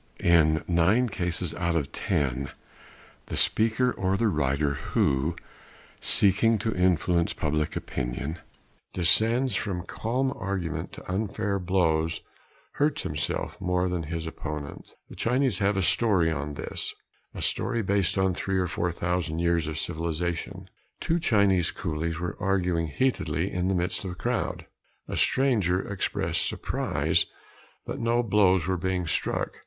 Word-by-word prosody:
In 80 -2 +4
nine 95 +9 +3
cases 90 -3 -2
out 85 -1 -1
of 75 -4 -1
ten 70 -1 -1 0.8
the - - -4
speaker 115 +3 +2
or 95 -2 0
the 115 0 +2
writer 70 -3 +1
who, 70 +3 0 0.7
seeking 105 +3 +4
to 110 +2 -1
influence 90 -1 +2
public 75 0 -1
opinion, 70 +6 -3 0.6
descends 115 +8 +3
from 95 -5 -2
calm 130 +6 -1
argument 95 -4 -3
to - - -10
unfair 100 +1 -1
blows 80 -3 +1 0.5
hurts 145 0 0
himself 75 +6 -3
more 90 0 +1
than 90 -1 -1
his 80 +1 -4
opponent. 75 -3 -6 0.2
The - - -11
Chinese 125 -4 +1
have 100 0 +2
a 95 - +1
story 90 -5 +3
on 75 -1 -3
this - - -4 0.4
a - - -5
story 120 -2 0
based 100 -1 +2
on 95 -1 +2
three 95 +2 -1
or 90 - +2
four 90 0 -1
thousand 85 -2 -2
years 85 -2 +1
of 80 0 -4
civilization: 85 +1 -3 0.3
Two 165 +1 0
Chinese 100 - +3
coolies 80 -1 -3
were 90 0 -3
arguing 90 -4 +1
heatedly 85 - 0
in 90 0 -1
the 95 - +1
midst 90 +3 -1
of 95 - -4
a 90 - -6
crowd. - - -2 0.4
A - - -4
stranger 105 -9 +2
expressed 100 -2 -1
surprise - - 0 0.6
that - - -5
no 120 +1 +2
blows 95 -5 +3
were 95 0 0
being 90 0 -1
struck. 80 - -2
90 Hz, 140 wpm, -27 LUFS, 80-100 Hz, 0.8 s, In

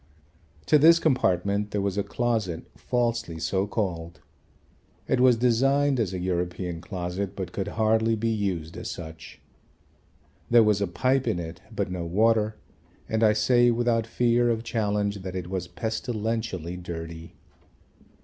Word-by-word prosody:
To 150 - +5
this 165 +3 +7
compartment 100 - +1
there 105 - -2
was 100 -1 -1
a 100 - +1
closet 105 -4 -1
falsely 115 -8 -1
so 95 +4 -1
called. 85 -6 -3 0.9
It 130 - +1
was 125 -2 +5
designed 135 +3 +2
as 105 -5 0
a 95 - -3
European 90 -1 -2
closet 90 +2 -4
but 95 -2 -5
could 95 -1 -3
hardly 110 +1 +3
be 115 +1 -1
used 95 -7 -2
as - - -5
such. 80 -1 -9 1.1
There 120 -1 +7
was 105 -2 +2
a 100 - +1
pipe 130 +9 +1
in - - +1
it 85 +1 -6
but 100 -4 -2
no 90 -1 -3
water, 110 +4 +2 0.5
and 110 0 -1
I 105 -1 +5
say 120 +3 +4
without 115 -1 +1
fear 120 0 +2
of 115 -1 0
challenge 105 -3 -1
that 95 0 -6
it 90 -1 -5
was 90 -2 -3
pestilentially 110 -6 -3
dirty. 80 -1 -7
105 Hz, 150 wpm, -26 LUFS, 90-115 Hz, 1.1 s, this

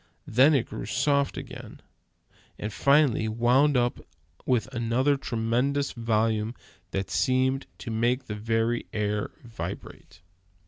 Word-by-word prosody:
Then 135 +7 +5
it 130 - +2
grew - - -7
softer 140 +3 +1
again, - - -10 0.8
and 105 0 -5
finally 140 -2 +3
wound 125 +6 +3
up 120 0 +1 0.5
with 125 -4 +2
another 120 +4 +1
tremendous 125 +3 0
volume 115 -1 0 0.3
that 95 0 -3
seemed 130 +1 +1
to 115 - -6
make 120 +4 0
the 105 - -5
very 115 +2 -1
air 105 -1 -1
vibrate. 115 -2 -8
120 Hz, 120 wpm, -27 LUFS, 110-135 Hz, 0.8 s, Then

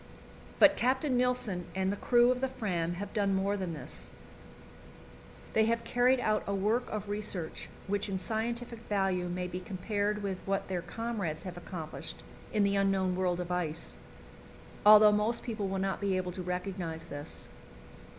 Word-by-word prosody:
But 295 0 +7
Captain 260 +2 +1
Nilsen 245 -8 0
and 190 0 +1
the - - -1
crew 240 +3 +4
of 250 0 -1
the 265 - +2
Fram 180 -10 -2
have 200 +3 -6
done 200 -3 +2
more 195 +1 +1
than 185 -4 -3
this; 140 - -7 1.4
they 220 0 +4
have 230 +1 +1
carried 245 +2 +3
out 215 -3 +2
a 200 - 0
work 215 +6 +1
of 215 -1 -4
research 205 -5 -4 0.2
which 200 +1 -1
in 195 - -1
scientific 235 +3 -3
value 190 -3 +1
may 180 +1 -2
be 180 0 -4
compared 205 +2 -2
with 190 -2 -2
what 195 0 -1
their 180 -2 -1
comrades 200 -4 -3
have 180 -2 -6
accomplished 170 -3 -6 0.3
in 210 -2 +2
the 200 0 +2
unknown 195 -2 +2
world 180 -1 0
of 180 0 -4
ice, 165 -2 -2 0.9
although 210 0 +10
most 210 +3 +1
people 215 -4 -2
will 190 0 -2
not 195 +1 -1
be 195 -2 +1
able 180 -1 -2
to 185 - -5
recognize 180 -2 -3
this. 145 -2 -6
195 Hz, 170 wpm, -31 LUFS, 180-220 Hz, 1.4 s, although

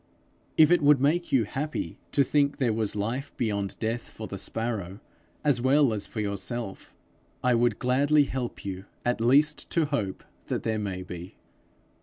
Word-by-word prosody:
If 155 0 +7
it 175 -1 +5
would 145 -1 +6
make 160 +6 +1
you 130 -4 +4
happy 145 +8 -4
to 140 - +4
think 140 +1 +2
there 125 -6 +1
was 110 -1 -1
life 115 +7 -3
beyond 100 -4 -1
death 115 +1 -3
for - - -8
the - - -6
sparrow 110 -5 -3 0.4
as 140 -5 +3
well 135 -1 +4
as 105 -2 -2
for 110 - -6
yourself, 105 +1 -4 0.5
I 125 0 +4
would 120 -2 +2
gladly 145 +4 +3
help 130 -6 -4
you 95 0 -5 0.2
at 120 -1 0
least 145 +6 +3
to 165 -2 +2
hope 110 -10 -2 0.2
that - - -2
there 110 -1 0
may 95 -3 -3
be. 90 0 -8
120 Hz, 170 wpm, -27 LUFS, 105-140 Hz, 0.5 s, If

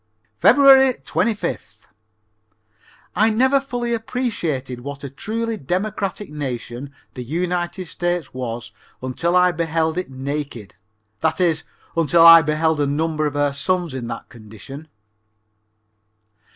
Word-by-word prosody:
Feb. - - +6 0.5
25th. 225 -3 -2 1.3
I 215 +4 +4
never 260 +5 +3
fully 245 -3 -3
appreciated 175 - -3
what 140 +2 -8
a 140 - -6
truly 225 +9 -3
democratic 195 +3 -3
nation 130 -2 -5 0.2
the 125 - -6
United 175 +5 -2
States 175 0 -3
was 120 -2 -5 0.3
until 170 +7 -1
I 180 0 +5
beheld 165 0 -1
it 185 - -5
naked, 135 -5 -5 0.5
that 160 +1 0
is, 165 -3 +1 0.3
until 165 +1 +4
I 165 0 +11
beheld 155 0 +1
a 145 - +1
number 155 +1 0
of 145 - -5
her 145 -1 +1
sons 175 +2 -1
in 125 -3 -5
that - - -6
condition. 115 +7 -11
160 Hz, 120 wpm, -21 LUFS, 140-180 Hz, 1.3 s, I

